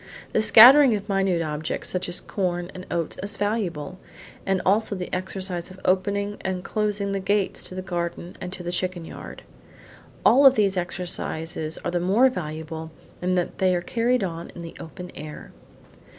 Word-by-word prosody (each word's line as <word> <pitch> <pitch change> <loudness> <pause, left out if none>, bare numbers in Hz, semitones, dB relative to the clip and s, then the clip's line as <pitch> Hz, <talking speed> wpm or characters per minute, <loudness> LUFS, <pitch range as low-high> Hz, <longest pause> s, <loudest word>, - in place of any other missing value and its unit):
The - - +3
scattering 245 +4 +9
of 205 0 -5
minute 195 -4 +1
objects, 155 0 -3
such 185 -1 -2
as 175 - -1
corn 175 -2 -3
and 185 0 -9
oats, 165 -2 -3
is 200 +1 -4
valuable, 185 -6 -2 0.5
and 195 -1 +2
also 205 +2 +2
the 180 -1 -6
exercise 185 -1 +1
of 185 0 -13
opening 200 +2 0
and 185 -1 -3
closing 205 -2 -1
the 195 - -1
gates 200 +1 0
to 185 - -9
the 185 - -4
garden 175 -1 -4
and 180 - -5
to 185 -1 -7
the 175 - -3
chicken 180 -1 -2
yard. - - -10 0.8
All 270 +4 +6
of 265 - +6
these 200 -3 +2
exercises 170 -3 -3
are 175 - 0
the 175 - 0
more 205 +9 +4
valuable 160 -4 -6 0.3
in 180 +1 +1
that 175 -1 -2
they 185 -1 +3
are 175 - -1
carried 240 +4 0
on 170 -2 -5
in 170 - -8
the 165 - -9
open 180 +2 -9
air. 150 +1 -9
185 Hz, 180 wpm, -24 LUFS, 175-200 Hz, 0.8 s, scattering